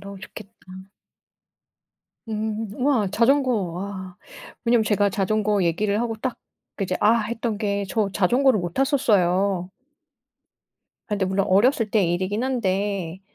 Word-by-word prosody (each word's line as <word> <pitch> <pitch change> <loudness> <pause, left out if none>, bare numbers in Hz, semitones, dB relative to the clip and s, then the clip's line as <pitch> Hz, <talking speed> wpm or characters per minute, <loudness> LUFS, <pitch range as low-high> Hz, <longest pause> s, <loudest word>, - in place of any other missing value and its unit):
너무 200 -1 -9
좋겠다. 210 0 -10 1.8
음 220 0 -3
우와. 250 -6 +1
자전거 255 +5 +3
와. 185 -1 -4 0.5
왜냐면 235 -1 +3
제가 205 -1 +2
자전거 205 +1 0
얘기를 200 +5 0
하고 235 -2 -2
딱 255 +1 -3 0.4
이제 185 -1 -1
'아!' 210 +2 +5
했던 230 0 -3
게 200 -2 -1
저 210 -2 0
자전거를 245 +6 +3
못 175 -1 -5
탔었어요. 195 - +1 1.4
아 - - -33
근데 195 -2 0
물론 190 +1 0
어렸을 220 +3 +3
때 210 -4 +3
일이기는 185 +7 -1
한데 195 -7 -2
205 Hz, 255 characters per minute, -23 LUFS, 190-225 Hz, 1.8 s, 아